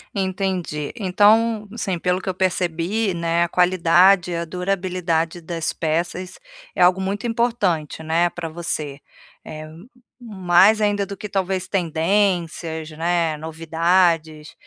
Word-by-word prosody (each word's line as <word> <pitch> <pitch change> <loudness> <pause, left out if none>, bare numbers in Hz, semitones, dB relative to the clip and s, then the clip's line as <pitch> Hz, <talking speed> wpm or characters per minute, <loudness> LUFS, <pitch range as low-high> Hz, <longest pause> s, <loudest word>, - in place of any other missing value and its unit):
Entendi, 185 -6 -2
então, 215 +2 +3
assim, 195 -6 -3
pelo 180 +2 0
que 190 - -12
eu 185 - 0
percebi, 185 +2 -1
né, 170 0 0
a - - 0
qualidade, 180 +1 +4
a 170 0 -2
durabilidade 180 -2 -2
das 165 -1 -3
peças 175 +3 -3 0.4
é - - -1
algo 180 +1 +5
muito 200 +4 -2
importante, 210 -11 -1
né, 165 +2 +1
pra 165 -2 -6
você, 155 -4 -4 0.5
eh, 155 0 -8
m 165 +8 -13 0.3
mais 200 -1 +3
ainda 205 -1 +1
do 200 - -7
que, 210 +2 -8
talvez, 190 -2 -2
tendências 170 -2 0
né, 165 -1 0
novidades. 160 0 0
180 Hz, 125 wpm, -21 LUFS, 165-195 Hz, 0.5 s, algo